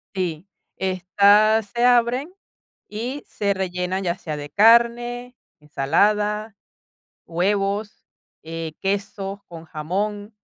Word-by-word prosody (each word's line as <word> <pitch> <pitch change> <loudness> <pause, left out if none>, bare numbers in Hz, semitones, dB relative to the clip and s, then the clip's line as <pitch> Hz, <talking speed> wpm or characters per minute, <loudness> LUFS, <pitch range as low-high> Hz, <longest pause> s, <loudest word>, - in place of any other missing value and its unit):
Sí, 180 -1 -3 0.3
estas 200 +4 +3
se 235 - +1
abren 245 +6 +3 0.6
y 245 +7 -4
se 200 -1 -1
rellenan, 185 0 -2
ya 175 +1 -1
sea 155 -5 -5
de 145 0 -7
carne, 235 - +3 0.2
ensalada, 210 +9 0 0.7
huevos, 200 +4 -1 0.4
eh, 165 0 -5
queso 200 0 -3
con 165 -1 -10
jamón, 205 +7 -3
200 Hz, 95 wpm, -22 LUFS, 180-220 Hz, 0.7 s, estas